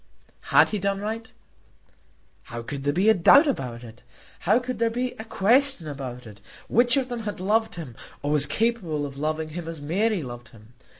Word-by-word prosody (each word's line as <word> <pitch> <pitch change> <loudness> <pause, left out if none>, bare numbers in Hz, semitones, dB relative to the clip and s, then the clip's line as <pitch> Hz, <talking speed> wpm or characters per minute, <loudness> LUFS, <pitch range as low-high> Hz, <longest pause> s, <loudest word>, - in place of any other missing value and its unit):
Had - - +5
he 210 - -2
done 195 0 -1
right? 220 +2 -5 1.1
How 115 0 -7
could 140 +3 -6
there 145 - +2
be 185 +7 +1
a 220 - +7
doubt 220 - +6
about 125 - -3
it? 115 0 -13 0.4
How 200 +6 +3
could 250 -2 -4
there 230 0 +2
be 245 +2 -2
a - - -5
question 230 - +2
about 130 -4 -7
it? 105 -1 -13 0.3
Which 240 +2 +4
of 265 -2 0
them 245 -2 -4
had 210 -4 -5
loved 220 +4 0
him, 150 -9 -8 0.3
or 145 - -1
was 145 -1 +5
capable 175 -6 -1
of 140 -1 -8
loving 155 +1 -2
him 165 +1 -7
as 165 -2 -5
Mary 185 +5 0
loved 120 -2 -9
him? 110 +1 -18
175 Hz, 195 wpm, -25 LUFS, 140-225 Hz, 1.1 s, a